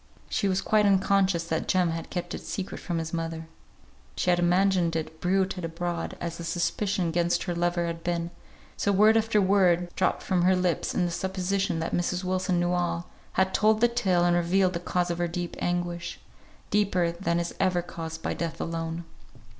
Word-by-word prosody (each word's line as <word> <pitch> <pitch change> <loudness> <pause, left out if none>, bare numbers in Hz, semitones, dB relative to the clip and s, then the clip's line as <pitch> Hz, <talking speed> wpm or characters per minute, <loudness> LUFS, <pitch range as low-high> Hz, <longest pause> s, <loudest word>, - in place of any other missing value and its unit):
She 200 - +1
was 190 0 +1
quite 210 0 +3
unconscious 195 -2 +3
that 160 -1 -2
Jem 180 -3 +2
had 165 0 -5
kept 175 -1 -4
it - - -4
secret 195 -1 -5
from 175 - -3
his 160 0 -4
mother; 165 -1 -3 0.7
she 180 - +1
had 175 - +2
imagined 175 -1 +2
it 160 0 -4
bruited 185 0 0
abroad 170 +1 -3
as 170 -1 -5
the - - -5
suspicion 180 +3 0
against 170 +1 +1
her 175 - -2
lover 175 0 0
had 165 0 -4
been; 170 -1 -2 0.4
so 200 - +1
word 210 +3 +5
after 225 -1 +3
word 180 -3 +3
(dropped 185 - 0
from 185 -2 +1
her 185 +2 +4
lips 180 -2 0
in 180 - +2
the 175 - -2
supposition 190 0 -1
that 165 - -3
Mrs. 175 +1 0
Wilson 185 -1 0
knew 175 0 +1
all) 175 -1 -1 0.2
had 190 0 +1
told 215 0 +3
the 240 - +5
tale 185 -7 +1
and 175 0 +3
revealed 180 +2 +2
the 170 - -2
cause 175 0 -1
of 170 - -3
her 175 - +1
deep 175 0 -4
anguish; 175 -1 -2 0.5
deeper 185 -5 +2
than 170 -1 -1
is 170 0 -3
ever 180 -2 +2
caused 160 -2 -7
by - - -1
Death 165 -1 -4
alone. 165 0 -3
175 Hz, 195 wpm, -27 LUFS, 170-190 Hz, 0.7 s, word